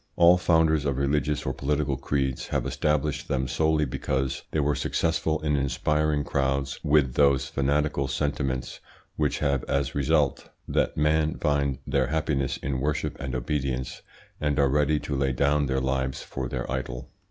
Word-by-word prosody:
All 85 Hz, +1 st, +7 dB
founders 80 Hz, -4 st, +3 dB
of 70 Hz, -2 st, 0 dB
religious 75 Hz, +1 st, 0 dB
or -, -, -1 dB
political 70 Hz, 0 st, -1 dB
creeds 65 Hz, -1 st, -2 dB
have -, -, -1 dB
established 75 Hz, -1 st, -1 dB
them 65 Hz, -1 st, -1 dB
solely 80 Hz, +3 st, +1 dB
because 65 Hz, 0 st, -2 dB
they 80 Hz, -, -1 dB
were 75 Hz, 0 st, +2 dB
successful 80 Hz, 0 st, 0 dB
in 75 Hz, -1 st, +1 dB
inspiring 75 Hz, +2 st, 0 dB
crowds 70 Hz, 0 st, -1 dB
with 75 Hz, -4 st, +3 dB
those 70 Hz, -1 st, +3 dB
fanatical 70 Hz, 0 st, 0 dB
sentiments 65 Hz, -2 st, -2 dB, 0.4 s
which 75 Hz, -2 st, 0 dB
have 70 Hz, -4 st, 0 dB
as 70 Hz, -1 st, -1 dB
result 70 Hz, 0 st, +1 dB, 0.2 s
that -, -, 0 dB
men 75 Hz, +1 st, +2 dB
find 70 Hz, -3 st, 0 dB
their 65 Hz, -3 st, +1 dB
happiness 70 Hz, -2 st, -1 dB
in 65 Hz, -1 st, -3 dB
worship 75 Hz, +2 st, -1 dB
and 65 Hz, 0 st, -4 dB
obedience 65 Hz, -1 st, -2 dB, 0.4 s
and 75 Hz, -2 st, 0 dB
are 70 Hz, -2 st, +4 dB
ready 75 Hz, +2 st, +2 dB
to 70 Hz, -, -3 dB
lay 65 Hz, -1 st, +1 dB
down 70 Hz, +2 st, +2 dB
their 65 Hz, 0 st, 0 dB
lives 65 Hz, 0 st, -1 dB
for 65 Hz, -2 st, -5 dB
their -, -, -3 dB
idol. 65 Hz, -2 st, -4 dB
70 Hz, 160 wpm, -26 LUFS, 65-75 Hz, 0.4 s, All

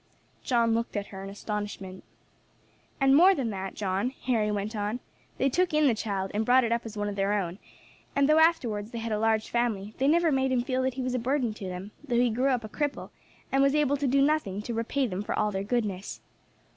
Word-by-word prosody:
John 235 Hz, -3 st, +2 dB
looked 230 Hz, -1 st, -1 dB
at 205 Hz, -, -4 dB
her 190 Hz, 0 st, -7 dB
in 195 Hz, -, -6 dB
astonishment. 200 Hz, -2 st, -5 dB, 1.0 s
"And 270 Hz, 0 st, +5 dB
more 370 Hz, +5 st, +7 dB
than 250 Hz, -6 st, -2 dB
that, 190 Hz, -1 st, -5 dB
John," 195 Hz, +3 st, -1 dB
Harry 225 Hz, -4 st, +1 dB
went 210 Hz, +2 st, -2 dB
on, 210 Hz, +3 st, -2 dB, 0.4 s
"they 270 Hz, -, +2 dB
took 350 Hz, +4 st, +1 dB
in 305 Hz, 0 st, +4 dB
the 260 Hz, -, +4 dB
child, 200 Hz, -3 st, -3 dB
and 210 Hz, +2 st, 0 dB
brought 255 Hz, +3 st, +5 dB
it 230 Hz, -, -1 dB
up 235 Hz, 0 st, -1 dB
as 220 Hz, -1 st, -9 dB
one 205 Hz, 0 st, -1 dB
of 205 Hz, -, -3 dB
their 200 Hz, +1 st, +1 dB
own; 190 Hz, -2 st, -2 dB, 0.6 s
and 280 Hz, 0 st, +3 dB
though 305 Hz, +1 st, +5 dB
afterwards 240 Hz, -11 st, +2 dB
they 235 Hz, -, -7 dB
had 230 Hz, 0 st, -4 dB
a 210 Hz, -, 0 dB
large 220 Hz, 0 st, +1 dB
family, 220 Hz, -4 st, -1 dB
they 270 Hz, -, +2 dB
never 330 Hz, +2 st, +4 dB
made 265 Hz, -1 st, +1 dB
him 250 Hz, -2 st, +1 dB
feel 255 Hz, +1 st, -1 dB
that 260 Hz, -1 st, -1 dB
he 260 Hz, -, -3 dB
was 255 Hz, 0 st, -2 dB
a 250 Hz, -, 0 dB
burden 250 Hz, -1 st, 0 dB
to 210 Hz, -, -8 dB
them, 185 Hz, +2 st, -6 dB
though 260 Hz, -5 st, -2 dB
he 245 Hz, -1 st, +3 dB
grew 250 Hz, +5 st, +1 dB
up 250 Hz, -3 st, 0 dB
a -, -, -5 dB
cripple, 290 Hz, +6 st, -3 dB, 0.4 s
and 270 Hz, -, +3 dB
was 275 Hz, +1 st, +3 dB
able 290 Hz, -2 st, +2 dB
to 280 Hz, 0 st, -1 dB
do 275 Hz, +2 st, +3 dB
nothing 280 Hz, -10 st, +1 dB
to 235 Hz, -, -4 dB
repay 230 Hz, +4 st, 0 dB
them 190 Hz, -4 st, -3 dB
for 210 Hz, -, -3 dB
all 210 Hz, 0 st, +1 dB
their 195 Hz, -1 st, -2 dB
goodness. 205 Hz, -4 st, -2 dB
230 Hz, 240 wpm, -28 LUFS, 205-270 Hz, 1.0 s, more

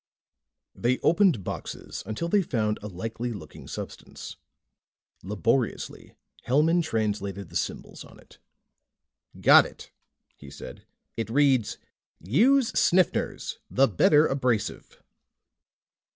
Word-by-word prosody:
They 125 Hz, +2 st, 0 dB
opened 170 Hz, -, +3 dB
boxes -, -, -6 dB
until 110 Hz, +10 st, -3 dB
they 200 Hz, +3 st, +3 dB
found 110 Hz, -, -1 dB
a 105 Hz, -, -6 dB
likely 115 Hz, +5 st, -5 dB
looking 80 Hz, -8 st, -11 dB
substance. -, -, -8 dB, 0.9 s
Laboriously, 105 Hz, +6 st, -2 dB, 0.3 s
Hellman 155 Hz, +7 st, +3 dB
translated 100 Hz, -, -2 dB
the 85 Hz, -, -14 dB
symbols 80 Hz, -, -4 dB
on -, -, -16 dB
it. -, -, -20 dB, 1.0 s
"Got -, -, +7 dB
it," -, -, -14 dB, 0.4 s
he 70 Hz, -, -13 dB
said. 70 Hz, -, -11 dB, 0.3 s
"It 115 Hz, -1 st, -3 dB
reads: 130 Hz, -3 st, +2 dB, 0.4 s
'USE 235 Hz, -, +3 dB
SNIFFNERS 180 Hz, 0 st, +1 dB
THE 135 Hz, +1 st, +4 dB
BETTER 150 Hz, -, +4 dB
ABRASIVE.'" 125 Hz, -7 st, -2 dB
120 Hz, 105 wpm, -26 LUFS, 105-150 Hz, 1.0 s, Got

